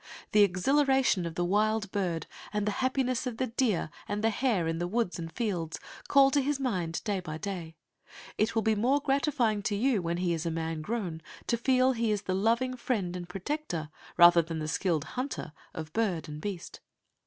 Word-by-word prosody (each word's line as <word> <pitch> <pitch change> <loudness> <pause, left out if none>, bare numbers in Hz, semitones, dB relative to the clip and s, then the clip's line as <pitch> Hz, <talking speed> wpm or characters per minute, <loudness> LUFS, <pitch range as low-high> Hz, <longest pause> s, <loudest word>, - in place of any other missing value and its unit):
The 210 - +5
exhilaration 250 +1 +3
of 165 - -7
the 175 - 0
wild 210 +2 +1
bird, 180 -5 -1 0.3
and 210 -1 -1
the 210 - +1
happiness 255 -1 0
of 240 -3 -4
the 260 - +1
deer 225 - 0 0.2
and 205 +1 -2
the 225 - +3
hare 215 -7 +1
in 165 0 -1
the 175 - -1
woods 220 -2 -1
and 165 -1 -5
fields, 180 -9 -2 0.3
call 275 -1 +6
to 285 - +3
his 280 +1 -1
mind 180 -11 -2
day 205 -3 -1
by 155 -4 -6
day. 170 -2 -5 0.6
It 220 +2 0
will 225 - +2
be 220 - +3
more 245 +7 +2
gratifying 270 -6 +1
to 205 +1 -1
you 230 -1 +2
when 170 0 -1
he 175 -1 +1
is 165 0 -2
man 165 -1 -2
grown 180 -4 -3 0.2
to 235 - +1
feel 255 +2 +3
he 230 -3 0
is 205 -1 -1
the 185 - -1
loving 230 +6 +1
friend 210 -8 -2
and 175 -1 -6
protector, 185 - -4 0.3
rather 175 0 +8
than 165 0 -5
the 155 -1 -3
skilled 165 -1 0
hunter 250 - -5 0.2
of 155 -1 -7
bird 180 -7 0
and 150 0 -7
beast. 190 -3 -5
205 Hz, 200 wpm, -29 LUFS, 170-245 Hz, 0.6 s, rather